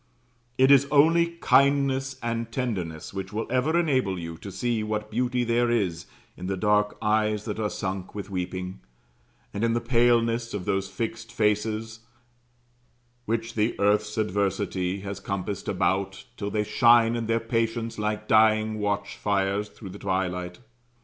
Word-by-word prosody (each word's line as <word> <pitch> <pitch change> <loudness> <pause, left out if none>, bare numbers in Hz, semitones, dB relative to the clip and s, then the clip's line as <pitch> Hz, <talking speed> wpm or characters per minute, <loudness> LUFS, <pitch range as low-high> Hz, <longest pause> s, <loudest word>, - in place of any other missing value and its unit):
It 130 +1 +5
is 140 0 +6
only 160 +4 +5
kindness 135 -1 +3
and 115 0 -2
tenderness 95 - -3
which 95 0 -5
will 110 +2 -2
ever 145 +7 +2
enable 130 - +1
you 85 -1 -6
to 100 - -8
see 115 +4 -1
what 105 0 -3
beauty 125 +2 0
there 120 0 +2
is 95 -7 -1 0.3
in 90 - -7
the 95 0 -2
dark 105 +1 +2
eyes 105 0 +1
that - - -4
are 105 -1 0
sunk 95 -2 -5
with 100 -2 -5
weeping, 90 0 -4 0.7
and 100 - -3
in 115 0 +2
the 120 - +1
paleness 115 -1 +2
of 95 -3 -4
those 95 0 -1
fixed 115 +3 -5
faces 110 0 -1 1.3
which 115 +1 -2
the 110 +1 0
earth's 105 +1 +2
adversity 100 -2 -1
has 100 -1 -5
compassed 100 0 -4
about, 95 0 -1
till 100 -1 -4
they 105 0 0
shine 115 +1 +4
in 115 -1 -3
their 115 0 +2
patience 115 0 -2
like 105 0 -2
dying 110 0 +4
watchfires 100 0 -1
through 100 - -11
twilight. 90 -2 -3
105 Hz, 150 wpm, -26 LUFS, 100-115 Hz, 1.3 s, is